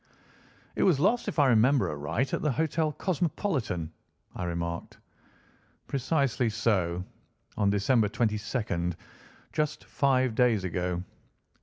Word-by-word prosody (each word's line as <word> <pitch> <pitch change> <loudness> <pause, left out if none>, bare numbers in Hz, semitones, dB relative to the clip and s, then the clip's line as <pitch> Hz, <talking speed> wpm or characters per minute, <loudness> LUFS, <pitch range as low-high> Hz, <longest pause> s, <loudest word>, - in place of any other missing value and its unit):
"It - - -1
was 170 -8 +4
lost, 225 +10 +2
if - - -3
I 145 - +5
remember 125 +4 +4
aright, 75 - -2
at - - 0
the 150 - +1
Hotel 155 +1 0
Cosmopolitan," 150 - -1 0.4
I 90 - -3
remarked. 85 -1 -4 0.9
"Precisely 135 -3 0
so, 95 -6 0 0.5
on 100 -2 +2
December 105 +2 +2
22nd, 105 -6 -1 0.6
just 150 0 -1
five 130 -3 +2
days 115 -4 +3
ago. 90 -1 -2
115 Hz, 115 wpm, -28 LUFS, 90-140 Hz, 0.9 s, I